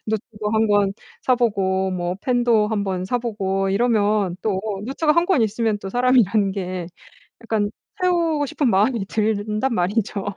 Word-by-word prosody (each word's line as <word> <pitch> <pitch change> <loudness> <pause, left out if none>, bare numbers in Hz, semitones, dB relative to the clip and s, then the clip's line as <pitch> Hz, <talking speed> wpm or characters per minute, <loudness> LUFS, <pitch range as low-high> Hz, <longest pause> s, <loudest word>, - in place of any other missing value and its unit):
노트도 210 -1 -3
1 220 0 +3
권 205 -1 +3 0.3
사 255 - +3
보고 190 -5 0
뭐 175 0 -2
펜도 240 -4 +2
한번 195 -4 -2
사 245 +6 -1
보고 195 -5 -2
이러면 210 -4 +1
또 195 -4 0 0.3
노트가 300 +3 +1
1 335 +2 +2
권 355 -11 +3
있으면 220 0 0
또 195 -1 -7
사람이라는 230 -4 +3
게 185 -3 -4 0.6
약간 215 -2 -1 0.3
채우고 335 -5 +1
싶은 270 0 0
마음이 210 +2 +2
든단 215 +3 -1
말이죠. 200 +2 -1
215 Hz, 280 characters per minute, -22 LUFS, 195-240 Hz, 0.6 s, 1